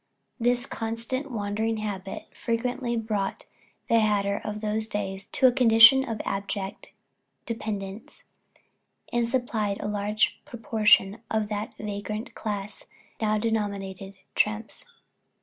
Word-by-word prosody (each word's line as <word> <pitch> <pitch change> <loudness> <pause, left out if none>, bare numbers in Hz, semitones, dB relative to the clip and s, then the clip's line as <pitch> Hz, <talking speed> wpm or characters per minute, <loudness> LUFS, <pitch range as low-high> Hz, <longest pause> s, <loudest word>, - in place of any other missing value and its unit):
This 245 +1 +2
constant 230 +5 -2
wandering 220 0 -1
habit 195 -3 -5
frequently 240 +1 -1
brought 210 -3 -2 0.4
the 230 - +4
hatter 205 -2 +1
of 210 0 -4
those 215 0 -1
days 195 -2 -4
to 260 - +1
a 255 - +8
condition 240 +1 +8
of 225 -5 -4
abject 195 0 -4 0.6
dependence, 210 -3 -5 0.9
and 235 -1 +1
supplied 225 -5 0
a - - -3
large 210 +1 0
proportion 220 -5 +3
of 220 -1 0
that 210 0 -4
vagrant 210 +1 -5
class 205 -2 -4 0.3
now 215 -1 +2
denominated 200 -3 -2 0.2
"tramps." 215 +1 -1
215 Hz, 115 wpm, -27 LUFS, 205-230 Hz, 0.9 s, a